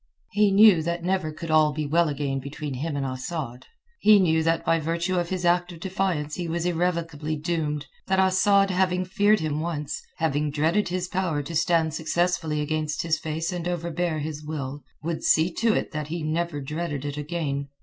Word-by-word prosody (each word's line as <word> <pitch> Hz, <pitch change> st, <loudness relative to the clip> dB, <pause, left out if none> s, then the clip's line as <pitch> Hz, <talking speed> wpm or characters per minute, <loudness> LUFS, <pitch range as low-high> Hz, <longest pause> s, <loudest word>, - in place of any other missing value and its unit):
He 210 Hz, 0 st, +4 dB
knew 200 Hz, -3 st, +7 dB
that 170 Hz, +1 st, -2 dB
never 180 Hz, -3 st, 0 dB
could 160 Hz, +1 st, -6 dB
all 155 Hz, -1 st, +4 dB
be 155 Hz, 0 st, -2 dB
well 165 Hz, +2 st, +2 dB
again 140 Hz, -2 st, -2 dB
between 140 Hz, +1 st, -6 dB
him 145 Hz, +3 st, -3 dB
and 140 Hz, -, -1 dB
Asad. 130 Hz, -1 st, -5 dB, 0.3 s
He 215 Hz, 0 st, +7 dB
knew 160 Hz, -4 st, +3 dB
that 165 Hz, +1 st, +1 dB
by 165 Hz, -, +3 dB
virtue 170 Hz, +3 st, -1 dB
of 175 Hz, -1 st, -2 dB
his 185 Hz, -2 st, -2 dB
act 175 Hz, +1 st, +2 dB
of 170 Hz, -, -10 dB
defiance 180 Hz, -5 st, -1 dB
he 175 Hz, 0 st, -3 dB
was 170 Hz, +1 st, -2 dB
irrevocably 165 Hz, -3 st, -1 dB
doomed, 150 Hz, -2 st, -2 dB, 0.2 s
that 190 Hz, -, +2 dB
Asad 195 Hz, +1 st, +4 dB
having 185 Hz, 0 st, +1 dB
feared 205 Hz, +2 st, +3 dB
him 155 Hz, -1 st, -1 dB
once, 155 Hz, -3 st, -3 dB, 0.2 s
having 150 Hz, -2 st, 0 dB
dreaded 160 Hz, +8 st, +1 dB
his 180 Hz, 0 st, -2 dB
power 180 Hz, -6 st, -1 dB
to 165 Hz, +4 st, -6 dB
stand 160 Hz, -1 st, +2 dB
successfully 160 Hz, -1 st, 0 dB
against 155 Hz, 0 st, -1 dB
his 160 Hz, -1 st, 0 dB
face 160 Hz, +3 st, -3 dB
and 175 Hz, -1 st, -3 dB
overbear 170 Hz, -1 st, -1 dB
his 150 Hz, 0 st, -5 dB
will, 145 Hz, -2 st, -5 dB, 0.2 s
would 165 Hz, 0 st, -3 dB
see 165 Hz, +2 st, +3 dB
to 225 Hz, +3 st, +2 dB
it -, -, -1 dB
that 150 Hz, -2 st, -4 dB
he 165 Hz, +1 st, -4 dB
never 155 Hz, -1 st, -1 dB
dreaded 150 Hz, 0 st, -4 dB
it 145 Hz, -1 st, -3 dB
again. 145 Hz, -2 st, -3 dB
165 Hz, 190 wpm, -25 LUFS, 150-175 Hz, 0.3 s, knew